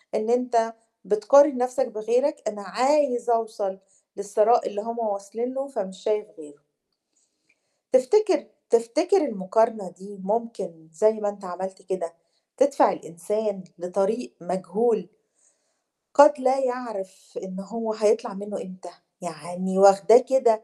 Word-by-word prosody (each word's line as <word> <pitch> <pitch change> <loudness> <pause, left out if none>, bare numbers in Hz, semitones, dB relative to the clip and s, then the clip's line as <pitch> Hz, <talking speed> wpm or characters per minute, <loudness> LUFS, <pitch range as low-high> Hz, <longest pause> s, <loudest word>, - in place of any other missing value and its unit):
إن 215 +1 -2
أنت 235 -2 +1 0.3
بتقارن 255 +8 +5
نفْسك 250 +1 -1
بغيرك، 240 +6 -1
أنا 210 -1 -8
عايز 245 +5 +1
أوصل 220 -4 -1 0.4
للثراء 210 +4 +2
اللي 205 - -4
هُم 230 +2 -6
واصلين 215 +3 -4
له 270 +1 -4
فمش 195 -7 -6
شايف 210 -1 -1
غيرُه. 145 -1 -15 1.3
تفتكر 425 -10 +3 0.2
تفتكر 300 - +2
المقارنة 225 - 0
دي 195 +3 -14
ممكن 200 -6 -4
زي 215 +7 +3
ما 215 -1 -3
أنت 205 -1 -10
عملت 190 +2 -7
كده، 170 -3 -5 0.4
تدفع 275 +1 +4
الإنسان 200 +4 -4
لطريق 195 +7 -2
مجهول 185 +3 -1 1.0
قد 290 0 +7
لا 260 +1 +2
يعرِف 225 -7 -5
إن 190 0 -8
هو 220 +3 -4
هيطلَع 220 +2 +1
منه 200 0 -7
إمتى؟ 185 -1 -11 0.3
يعني 175 +3 -5
واخداه 195 +3 +7
كده 245 -3 +2
215 Hz, 120 wpm, -24 LUFS, 195-245 Hz, 1.3 s, قد